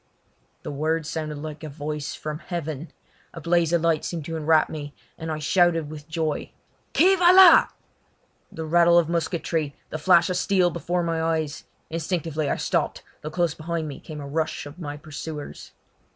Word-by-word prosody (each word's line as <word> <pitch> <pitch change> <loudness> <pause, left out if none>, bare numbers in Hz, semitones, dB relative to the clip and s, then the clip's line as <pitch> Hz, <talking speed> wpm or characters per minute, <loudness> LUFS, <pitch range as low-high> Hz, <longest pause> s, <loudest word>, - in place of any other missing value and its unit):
The - - -5
words 155 +2 -1
sounded 155 -2 -4
like 150 +1 -7
a 155 - -5
voice 150 +1 -5
from 150 0 -5
heaven. 160 -3 -5 0.4
A - - -6
blaze 170 0 +2
of 170 -1 +2
light 165 -2 +2
seemed 165 -4 -4
to 165 - -4
enwrap 160 0 +3
me, 145 -2 -7 0.2
and 160 -1 -5
I 155 - -2
shouted 165 0 +2
with 150 -1 -9
joy. 160 -2 -2 0.5
"Qui 370 +4 +6
va 350 -1 +6
la?" 370 -2 +9 0.8
The 160 - -6
rattle 170 +1 +5
of 170 -2 +3
musketry, 165 -3 -1 0.2
the 155 - -4
flash 170 +1 +5
of 180 - 0
steel 180 -1 +2
before 175 +1 -2
my 165 -1 -1
eyes. 160 -2 -2 0.3
Instinctively 160 -2 -2
I - - +1
stopped, - - -1 0.2
though 155 - -5
close 170 -1 0
behind 165 0 -4
me 145 - -7
came 155 -2 -9
a 140 - -7
rush 155 +2 -2
of 145 +4 -11
my 145 -3 -5
pursuers. 150 -1 -8
160 Hz, 180 wpm, -24 LUFS, 150-170 Hz, 0.8 s, la